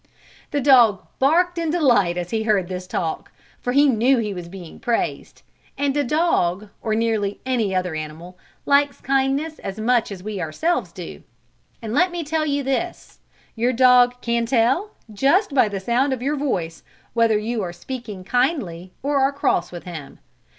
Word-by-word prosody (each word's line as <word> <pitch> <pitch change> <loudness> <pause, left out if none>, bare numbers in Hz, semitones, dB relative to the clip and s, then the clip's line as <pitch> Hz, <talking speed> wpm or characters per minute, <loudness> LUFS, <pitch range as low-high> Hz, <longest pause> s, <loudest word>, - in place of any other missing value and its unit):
The 290 - -1
dog 240 -8 +5
barked 345 +6 +3
in 330 -1 -1
delight 240 - +3
as 175 0 -4
he 225 - 0
heard 210 -5 +1
this 185 0 -5
talk, 165 -3 -3 0.3
for 245 - -2
he 285 +3 +5
knew 255 +1 +3
he 215 -3 -2
was 175 -2 -7
being 180 -3 -10
praised, 235 -1 -2 0.3
and 280 0 0
a 290 - +2
dog, 215 - +1
or 215 -1 -1
nearly 220 -3 0
any 230 -7 0
other 180 -2 -1
animal, 155 +3 -7 0.3
likes 285 0 +3
kindness 275 +4 0
as 195 +2 -6
much 235 0 +1
as 185 -2 -8
we 210 -2 -4
ourselves 315 - -1
do. - - -9 0.6
And 220 -1 -4
let 360 +7 +3
me 345 -1 -4
tell 310 +1 -1
you 285 -1 0
this, 275 +7 -3 0.4
your 240 +2 +1
dog 245 0 +5
can 235 0 0
tell, 260 - +2 0.2
just 280 - +2
by 250 -6 +4
the 200 -1 -4
sound 245 +7 +1
of 255 - -5
your 290 +3 0
voice, 180 - -2 0.3
whether 230 -2 +3
you 220 +2 -2
are 180 -3 -3
speaking 210 +1 -7
kindly 195 - -1
or 285 0 +1
are 270 +1 +3
cross 180 -11 0
with 175 -1 -8
him. 160 -6 -9
235 Hz, 175 wpm, -22 LUFS, 195-280 Hz, 0.6 s, dog